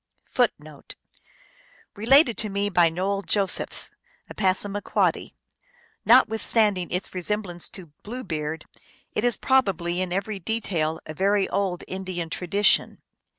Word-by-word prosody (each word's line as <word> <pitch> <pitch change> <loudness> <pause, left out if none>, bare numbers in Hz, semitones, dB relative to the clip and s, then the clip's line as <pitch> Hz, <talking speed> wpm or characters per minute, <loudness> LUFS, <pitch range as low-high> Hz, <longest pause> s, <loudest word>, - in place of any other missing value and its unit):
1 - - +4
1 - - -14 1.1
Related 240 +4 +5
to 215 - 0
me 200 +1 -1
by 175 -2 +4
Noel 195 +4 -2
Josephs, 200 -1 +1 0.4
a - - -10
Passamaquoddy. 200 +1 0 0.7
Notwith 225 -2 +5
standing 205 -6 +2
its 180 +2 -4
resemblance 185 -1 -3
to 180 -6 -11
Blue 245 +4 -7
Beard, 155 -2 -4 0.5
it 210 - -1
is 245 -1 +2
probably 185 -9 +1
in 185 -1 -3
every 195 +2 -2
detail 170 -6 -2
a 155 - -7
very 195 +4 +1
old 190 -3 -1
Indian 185 -3 -5
tradition. 200 +5 +1
195 Hz, 125 wpm, -24 LUFS, 175-210 Hz, 1.1 s, Related